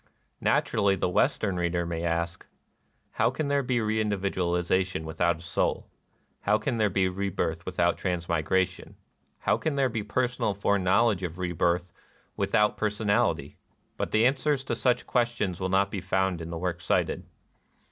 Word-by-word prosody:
Naturally 100 -2 +2
the 90 - 0
Western 90 +2 +1
reader 85 0 0
may 85 0 -3
ask, 85 +1 -1 0.4
— - - -43
"How 115 - +4
can 140 +3 -3
there 140 0 +2
be 125 -1 0
reindividualization 95 -5 0
with 80 0 -8
out 85 -2 +3
a - - -14
soul? 85 - -1 0.5
How 105 +1 +2
can 115 +3 -2
there 105 -2 +2
be 95 -1 +2
rebirth 90 -3 -2
without 90 -1 +1
transmigration? 90 +1 -1 0.5
How - - +2
can 160 -3 -2
there 135 -2 +2
be 115 -2 -2
personal 120 -1 -1
foreknowledge 100 +1 +2
of 90 -2 -4
rebirth 90 0 0 0.4
without 105 +1 +2
personal 105 -1 +2
ity?" - - -11 0.4
But - - -2
the 110 +2 +3
answers 135 +1 +1
to - - -2
such 125 -1 +1
questions 120 -7 0
will 95 0 -1
not 100 +1 +2
be 100 - -3
found 95 -1 0
in 80 - -6
the 85 - -4
work 85 0 -3
cited. 85 - 0
95 Hz, 160 wpm, -27 LUFS, 85-110 Hz, 0.5 s, How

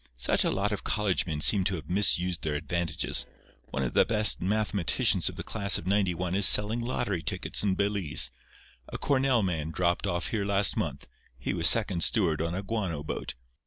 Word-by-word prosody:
Such - - +2
a - - 0
lot 100 +2 -1
of 105 - -4
college 100 -6 -1
men 75 -3 -4
seem 100 +4 +4
to 100 -1 -1
have 80 -3 -9
misused 90 -2 0
their 75 -2 -3
advantages. 80 +1 -1 0.4
One 65 - -4
of 60 - -4
the - - +4
best 105 -1 +4
mathematicians 100 -2 +1
of - - -10
the - - -6
class 100 -3 +3
of - - -9
'91 90 -3 -1
is 100 +1 +4
selling 105 +3 +4
lottery 105 -7 -3
tickets 95 0 -2
in 100 -2 0
Belize. 100 -5 +1 0.6
A - - -6
Cornell 130 -4 0
man 80 -5 -3
dropped 85 +4 -1
off 85 -1 -3
here 110 -3 -2
last 100 -1 +1
month. - - -5 0.3
He - - -4
was 85 0 +1
second 105 -6 +3
steward 85 -9 +1
on 85 +1 -3
a 95 - -5
guano 95 -8 -4
boat. - - -6
95 Hz, 195 wpm, -27 LUFS, 85-105 Hz, 0.6 s, seem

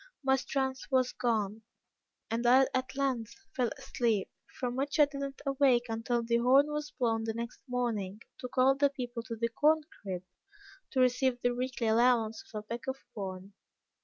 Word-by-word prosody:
"My 265 0 +4
strength 265 0 -2
was 255 -2 +2
gone, 220 -3 -1 0.7
and 235 +1 0
I 260 +2 +7
at 260 0 -2
length 255 -5 -1 0.2
fell 250 -4 +1
asleep, 235 -6 -1 0.3
from 245 -1 -2
which 280 +3 -1
I 295 - +9
did 280 -1 -8
not 275 -1 -5
awake 270 -3 +3
until 230 +1 -1
the 235 0 +2
horn 270 +5 +5
was 300 0 -3
blown 225 -5 0
the 225 -1 -2
next 235 +1 -5
morning, 225 -6 -2 0.2
to 250 - -5
call 255 +1 +4
the 280 +1 +3
people 245 -3 -5
to 230 0 -6
the 230 +1 -1
corn 310 +6 +3 0.2
crib, 185 -3 -4 0.7
to 260 - +1
receive 250 0 +2
their 245 0 +2
weekly 250 -1 -2
allowance 225 0 +3
of 215 - -5
a 210 - -5
peck 230 +4 -6
of 265 0 -2 0.2
corn. 190 -1 -6
245 Hz, 180 wpm, -31 LUFS, 230-265 Hz, 0.7 s, I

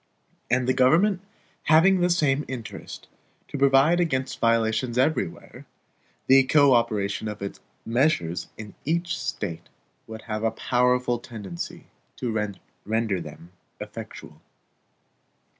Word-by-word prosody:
And 125 0 +1
the 130 - +3
government 170 +10 +3 0.4
having 180 +5 +5
the 175 - +3
same 150 -5 +2
interest 120 -3 -8 0.4
to - - -7
provide 140 +5 +4
against 130 -6 -1
violations 115 +1 +1
everywhere, 130 - -1 0.6
the 135 +1 +7
co 140 -1 +5
operation 110 -3 0
of 105 -1 -6
its 100 - -6 0.3
measures 115 - 0
in 105 -2 -9
each 170 +3 -1
State 105 - -5 0.4
would 110 0 -9
have 110 -1 -4
a 115 - +3
powerful 125 +1 +1
tendency 105 -8 -8 0.3
to 110 -4 -2 0.3
render 110 -3 -1
them 80 +2 -11 0.3
effectual. - - -9
125 Hz, 115 wpm, -25 LUFS, 110-140 Hz, 0.6 s, the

